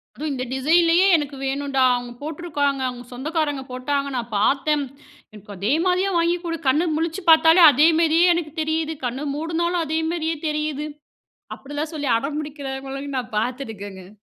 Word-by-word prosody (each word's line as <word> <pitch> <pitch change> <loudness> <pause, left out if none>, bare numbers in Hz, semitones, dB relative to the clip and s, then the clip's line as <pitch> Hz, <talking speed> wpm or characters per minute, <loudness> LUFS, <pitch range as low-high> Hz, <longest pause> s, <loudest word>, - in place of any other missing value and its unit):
"அதுவும் 300 0 -4
இந்த 255 -1 -3
டிசைன்லயே 335 +6 +4
எனக்கு 290 -2 -4
வேணுன்டா! 270 0 0
அவுங்க 245 0 -4
போட்டிருக்காங்க. 290 -3 -2
அவுங்க 245 -1 -7
சொந்தக்காரங்க 290 +1 -2
போட்டாங்க, 275 +2 -2
நான் 240 -1 -3
பார்த்தேன். 285 +6 +1 0.5
எனக்கு 210 0 -13
அதே 205 +7 -1
மாரியே 370 +2 +2
வாங்கி 340 +1 +2
குடு! 330 -1 -3
கண்ணு 310 +6 +3
முழிச்சு 330 +4 -2
பார்த்தாலே, 325 +2 +7
அதே 295 +5 +4
மாரியே 335 +1 +4
எனக்கு 335 -3 -3
தெரியுது. 315 0 -1
கண்ண 250 +4 -3
மூடுனாலும் 335 +2 -1
அதே 315 +1 -1
மாரியே 325 -1 -2
தெரியுது." 300 -1 -2 0.7
அப்படில்லாம் 290 +3 -6
சொல்லி 290 -4 -2
அடம்பிடிக்கிறவங்களையும் 275 0 -5
நான் 240 -3 -6
பார்த்துருக்கேங்க. 205 -6 -5
290 Hz, 145 wpm, -22 LUFS, 265-325 Hz, 0.7 s, பார்த்தாலே